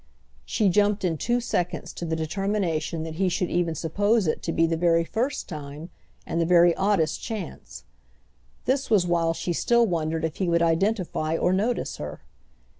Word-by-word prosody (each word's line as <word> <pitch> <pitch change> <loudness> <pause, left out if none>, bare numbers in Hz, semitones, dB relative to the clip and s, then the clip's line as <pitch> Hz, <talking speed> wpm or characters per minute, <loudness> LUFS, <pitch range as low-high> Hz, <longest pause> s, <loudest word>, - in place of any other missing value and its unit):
She 210 - +1
jumped 205 +1 +2
in 165 -4 -1
two 240 +1 +1
seconds 180 -8 -2
to 175 - -5
the 160 -1 -1
determination 165 -1 -1
that 160 0 -6
he 190 0 +2
should 180 0 -1
even 170 -2 0
suppose 205 +8 +1
it 155 - -1
to 165 - -2
be 165 0 +3
the 165 0 0
very 165 0 +3
first 240 - -2
time 150 +1 -8 0.3
and 165 - -1
the - - +2
very 175 -1 +5
oddest 195 -5 +1
chance: 195 - -7 0.8
this 270 +2 0
was 205 -5 +4
while 170 -1 +1
she 175 - -2
still 235 +7 +3
wondered 165 -4 -1
if 160 - -4
he 185 -3 0
would 170 0 +3
identify 165 -2 0
or 180 - +2
notice 220 +5 -1
her. 75 0 -7
175 Hz, 180 wpm, -25 LUFS, 165-205 Hz, 0.8 s, very